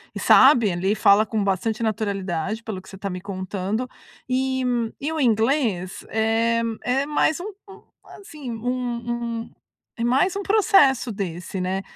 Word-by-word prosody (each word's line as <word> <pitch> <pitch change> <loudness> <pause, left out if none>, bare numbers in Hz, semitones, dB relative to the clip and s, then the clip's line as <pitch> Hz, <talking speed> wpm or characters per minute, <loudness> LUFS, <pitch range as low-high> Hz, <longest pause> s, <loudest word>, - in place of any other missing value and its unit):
E - - -4
sabe, 250 -7 +6
ali, 190 +4 0
fala 210 -1 +5
com 220 -1 -2
bastante 215 +4 -1
naturalidade, 200 -2 -2
pelo 205 -5 -5
que 190 - -16
você 195 - -10
tá 195 +1 -4
me 180 0 -6
contando. 195 +4 -3 0.4
E 260 0 0 0.4
e 295 +3 -3
o 320 - -3
inglês 225 -5 +1
é 225 +1 +1 0.2
é 265 +3 +1
mais 300 +2 +1
um 355 - -6 0.2
um 390 +1 -13 0.4
assim, 300 -10 -8
um 235 0 -3
um - - -16 0.5
é - - -1
mais 270 +11 +2
um 400 - -3
processo 390 - +4
desse, 185 -2 -5
né. 185 +1 -1
225 Hz, 155 wpm, -23 LUFS, 195-260 Hz, 0.5 s, sabe